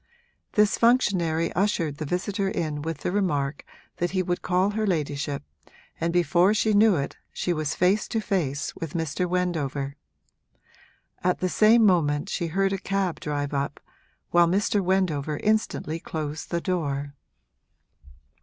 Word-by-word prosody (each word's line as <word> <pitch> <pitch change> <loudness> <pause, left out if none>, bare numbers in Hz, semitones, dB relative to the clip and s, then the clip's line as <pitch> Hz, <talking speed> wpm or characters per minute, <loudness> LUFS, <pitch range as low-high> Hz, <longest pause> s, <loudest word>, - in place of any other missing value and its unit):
This 210 0 +3
functionary 180 -9 +2
ushered 170 -7 0
the 155 - -3
visitor 195 +4 -1
in 155 -5 -2
with 160 -1 -4
the - - -1
remark 150 -8 -1 0.3
that 175 - 0
he 185 0 0
would 175 0 -2
call 185 +2 +1
her 215 0 -1
ladyship, 145 -5 -2 0.6
and 165 +1 0
before 175 +3 +3
she 215 0 +2
knew 210 -1 +5
it 140 -3 -3
she 180 - -1
was 155 -2 -2
face 190 +4 +2
to 225 - -1
face 155 -10 -2
with 165 -1 -6
Mr. 165 +2 -1
Wendover. 145 -6 -1 1.3
At 180 0 +2
the 185 - -1
same 220 +4 +5
moment 165 -3 +2
she 170 -5 -2
heard 195 +4 +1
a 195 - -2
cab 195 -2 -1
drive 145 -1 -3
up, 140 +1 -2 0.5
while 175 0 +5
Mr. 200 +3 +1
Wendover 160 -6 0
instantly 210 -6 0
closed 155 -1 -5
the 170 -1 -1
door. 145 -6 -2
175 Hz, 145 wpm, -25 LUFS, 150-195 Hz, 1.3 s, knew